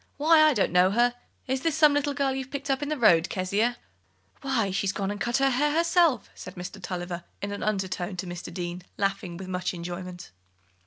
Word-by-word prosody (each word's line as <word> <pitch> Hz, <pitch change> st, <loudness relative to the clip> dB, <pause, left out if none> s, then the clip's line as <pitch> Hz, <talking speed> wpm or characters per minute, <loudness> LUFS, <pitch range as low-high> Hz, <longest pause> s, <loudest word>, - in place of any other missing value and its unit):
Why, 315 Hz, +2 st, +5 dB
I 310 Hz, -2 st, +5 dB
don't 205 Hz, -, +1 dB
know 180 Hz, +1 st, +5 dB
her. 240 Hz, +4 st, +3 dB, 0.3 s
Is 265 Hz, 0 st, -2 dB
it 325 Hz, -3 st, +1 dB
some 300 Hz, -1 st, +6 dB
little 290 Hz, 0 st, 0 dB
girl 275 Hz, -2 st, +1 dB
you've 265 Hz, -1 st, -4 dB
picked 280 Hz, 0 st, -3 dB
up 270 Hz, -, 0 dB
in 290 Hz, -, -2 dB
the 305 Hz, -, -1 dB
road, 180 Hz, -8 st, +4 dB
Kezia?" 205 Hz, +6 st, 0 dB, 0.6 s
"Why, 250 Hz, -8 st, 0 dB
she's 195 Hz, +1 st, 0 dB
gone 200 Hz, -1 st, -2 dB
and 205 Hz, -, -6 dB
cut 240 Hz, 0 st, +1 dB
her 270 Hz, 0 st, +3 dB
hair 295 Hz, +4 st, +1 dB
herself," 335 Hz, -5 st, +3 dB
said 180 Hz, -, -10 dB
Mr. 180 Hz, +2 st, -7 dB
Tulliver 175 Hz, -1 st, -5 dB, 0.2 s
in 200 Hz, -, -4 dB
an 205 Hz, -, -5 dB
undertone 190 Hz, -2 st, -2 dB
to 185 Hz, -, -3 dB
Mr. 175 Hz, 0 st, -7 dB
Deane, 175 Hz, 0 st, -5 dB, 0.2 s
laughing 195 Hz, -3 st, -2 dB
with 190 Hz, 0 st, -8 dB
much 180 Hz, 0 st, -2 dB
enjoyment. 175 Hz, +1 st, -7 dB
205 Hz, 210 wpm, -27 LUFS, 180-275 Hz, 0.6 s, some